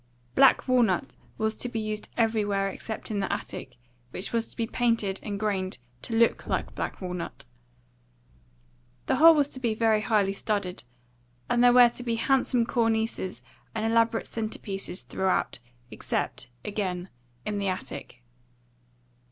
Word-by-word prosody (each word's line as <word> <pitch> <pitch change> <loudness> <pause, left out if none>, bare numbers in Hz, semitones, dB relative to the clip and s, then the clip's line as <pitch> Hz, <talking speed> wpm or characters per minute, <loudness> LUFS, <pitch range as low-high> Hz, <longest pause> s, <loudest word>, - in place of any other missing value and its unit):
Black 270 0 +5
walnut 240 -8 +2 0.2
was 220 0 -1
to 245 - -2
be 230 -2 -3
used 215 -1 -4
everywhere 205 -4 +1
except 220 +3 -6
in 205 - -1
the 195 - -1
attic, - - -5 0.3
which 185 - -5
was 230 -1 +1
to - - -12
be 230 - 0
painted 225 -5 0
and 205 -2 -4
grained 195 -3 -1 0.2
to 230 - -3
look 230 0 +3
like - - -1
black - - -4
walnut. 180 -2 -5 1.6
The - - +1
whole 325 +3 +9
was 290 -2 +2
to 260 - -7
be 230 -4 0
very 220 -1 +3
high 210 -3 +2
studded, 195 - -2 0.7
and 240 0 +4
there 245 - +8
were 245 -1 +8
to 240 - -9
be 235 -2 -1
handsome 250 0 +2
cornices 225 -4 0 0.3
and 220 0 -1
elaborate 230 0 +2
centre 220 -1 -4
pieces 195 -2 -4
throughout, 190 -7 0 0.3
except, - - -3 0.2
again, 190 -3 -2 0.4
in 210 -1 -2
the 200 - -1
attic. 185 -9 -5
220 Hz, 150 wpm, -27 LUFS, 195-235 Hz, 1.6 s, whole